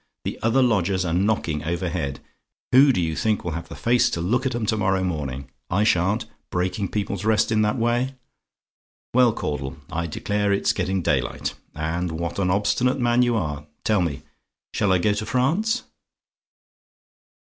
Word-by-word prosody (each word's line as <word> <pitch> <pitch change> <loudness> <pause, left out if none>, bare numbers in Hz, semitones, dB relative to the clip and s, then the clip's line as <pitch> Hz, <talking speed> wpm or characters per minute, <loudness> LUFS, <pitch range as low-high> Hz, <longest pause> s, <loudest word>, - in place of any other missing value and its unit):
The - - -4
other 120 +4 +3
lodgers 95 -5 +1
are 80 - -1
knocking 90 -5 0
overhead: 85 -4 -2 0.5
who 135 +2 +7
do 115 - 0
you 80 -2 0
think 110 +2 0
will 85 - -3
have 85 +1 -6
the - - -8
face 120 +1 +3
to - - -3
look 125 +10 +1
at 130 - -2
'em 120 -2 -1
to 110 - +1
morrow 95 -2 +1
morning? 70 -7 -3 0.2
I 100 +4 +2
sha'n't 95 0 +2 0.2
breaking 95 +3 -1
people's 100 -1 -3
rest 110 +1 +2
in 110 -1 +3
that 105 +4 +1
way! 120 +3 0 1.0
"Well, 125 -1 +5
Caudle 70 -9 -4
I 85 +1 -2
declare 105 +5 -1
it's 100 - +2
getting 95 -1 -1
daylight, - - -1 0.2
and 80 +2 -2
what 85 +3 -3
an 90 -2 +1
obstinate 105 +7 +1
man 120 0 +3
you 120 -1 +2
are! 75 -7 -3 0.2
tell 105 -4 +2
me, 80 -6 -2 0.5
shall 100 - +1
I 95 - +5
go 105 +4 +2
to 105 +1 -3
France?" 190 - +1
100 Hz, 170 wpm, -23 LUFS, 85-115 Hz, 1.0 s, who